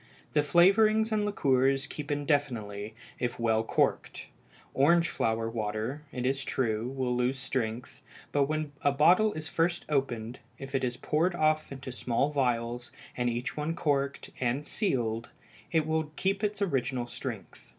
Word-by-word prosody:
The 150 - +4
flavorings 215 +8 +4
and 210 -1 +1
liqueurs 135 -7 +2
keep 150 0 -7
indefinitely 125 -8 -1 0.2
if 120 -1 -2
well 110 -1 +2
corked. - - 0 0.4
Orange 170 +5 +4
flower 115 0 0
water, 110 +4 -3
it 125 -1 -3
is 135 +1 0
true, 115 -4 -1
will 130 -2 -1
lose 125 +2 +1
strength, 125 -3 -3 0.3
but 145 -1 +3
when 155 0 -2
a 145 -3 +3
bottle 180 +10 +5
is 155 0 -5
first 170 +1 0
opened, 125 -5 -1 0.2
if 135 0 -9
it 135 -1 0
is 125 -1 -1
poured 165 +7 +1
off 155 -2 +1
into 135 -1 -7
small 125 +3 0
vials, 120 -3 -1 0.2
and 120 -1 0
each 120 +1 -3
one 155 +2 -2
corked 140 -3 -1
and 130 +4 0
sealed, 115 - -1 0.4
it 160 -2 +2
will 160 0 0
keep 195 +2 0
its 210 -1 0
original 130 -7 0
strength. 120 - -7
135 Hz, 150 wpm, -29 LUFS, 120-155 Hz, 0.4 s, bottle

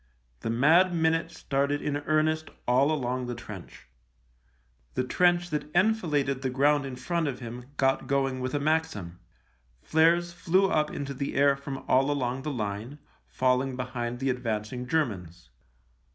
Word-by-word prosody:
The 115 - -4
mad 165 +10 +4
minute 165 0 +1
started 140 -2 -1
in 145 -1 -2
earnest 155 0 +1 0.2
all 130 +5 +4
along 130 -4 -1
the 120 - -4
trench. 105 - -10 1.1
The 130 - +1
trench 175 +5 +2
that 150 0 -2
enfiladed 155 -10 +2
the 130 - -1
ground 140 +2 +2
in 130 - -6
front 165 +5 -1
of 135 -3 -3
him 120 0 -7
got 135 -1 +1
going 135 -1 0
with 130 +2 -3
a - - +1
Maxim, 145 - -1 0.6
flares 170 +2 +3
flew 185 +2 +2
up 150 -1 +2
into 140 -1 -5
the 140 +1 -4
air 140 0 +4
from 140 -1 -7
all 135 +2 +3
along 130 -2 -1
the 150 - -4
line, 110 +2 -4 0.3
falling 130 +1 +1
behind 125 -1 -4
the 135 +1 0
advancing 125 0 -3
Germans. 90 - -2
135 Hz, 150 wpm, -28 LUFS, 125-155 Hz, 1.1 s, mad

